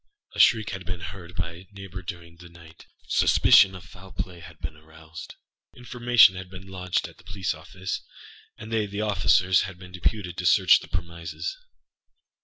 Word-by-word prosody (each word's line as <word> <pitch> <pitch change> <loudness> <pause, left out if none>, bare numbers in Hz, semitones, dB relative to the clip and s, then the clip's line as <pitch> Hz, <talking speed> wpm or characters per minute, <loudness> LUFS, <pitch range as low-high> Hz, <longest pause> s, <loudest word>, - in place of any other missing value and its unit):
A - - -8
shriek 110 -2 +5
had 95 -1 -6
been 90 0 -5
heard 90 0 -9
by 85 0 -2
a 90 +3 -14
neighbour 95 -2 -9
during 85 -3 -9
the 85 0 -13
night; 85 -1 -16 0.2
suspicion 95 0 +5
of 95 - -10
foul 95 0 -14
play 90 -1 -6
had 80 -1 -13
been 80 +1 -7
aroused; 80 +1 -12 0.4
information 120 -4 +5
had 95 -1 -8
been 95 0 -11
lodged 90 -1 -2
at - - -17
the - - -18
police 95 -1 -3
office, 90 +4 -6 0.6
and 110 - -10
they 110 -2 +1
(the 100 +1 -4
officers) 95 -3 +3
had 95 - -12
been 90 0 -13
deputed 90 +1 -2
to 90 - -4
search 95 0 +6
the - - -12
premises. 85 - -5
90 Hz, 180 wpm, -25 LUFS, 85-95 Hz, 0.6 s, search